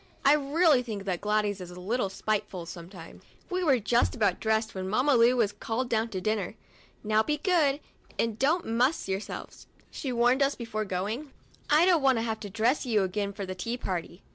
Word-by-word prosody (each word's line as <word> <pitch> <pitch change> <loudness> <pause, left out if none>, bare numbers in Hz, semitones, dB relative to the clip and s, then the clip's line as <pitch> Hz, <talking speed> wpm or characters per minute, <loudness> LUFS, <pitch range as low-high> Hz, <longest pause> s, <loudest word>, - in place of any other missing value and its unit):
I 280 - +7
really 300 0 +3
think 215 -5 -6
that 185 -3 -2
Gladys 210 -1 0
is 180 - -7
a 180 0 -10
little 200 +3 -1
spiteful 195 -3 -3
sometimes. 170 0 -10 0.3
We 365 0 0
were 280 -6 +4
just 235 +3 +1
about 215 -4 +1
dressed 220 0 0
when 190 0 -4
Mamma 255 +8 +2
Lu 240 +2 +5
was 215 -4 +2
called 230 +4 -3
down 225 0 0
to 190 - -4
dinner. 210 -1 -2 0.3
" - - -31
Now 215 0 +3
be 300 +6 -1
good 300 -5 +2 0.4
and 225 -2 -1
don't 315 +6 +2
muss 245 +7 +1
yourselves," 195 +2 -5 0.2
she 270 - -4
warned 245 +3 +3
us 275 +1 +2
before 215 -3 -4
going; 210 +10 -3 0.4
"I 305 +3 +5
don't 355 -4 +4
want 265 -2 +4
to 225 - 0
have 220 -1 -2
to 205 - -7
dress 225 +7 +1
you 220 -6 +2
again 200 +2 -2
for 200 0 -6
the 185 - -5
tea 230 +7 -4
party." 180 -4 -5
225 Hz, 205 wpm, -28 LUFS, 200-265 Hz, 0.4 s, I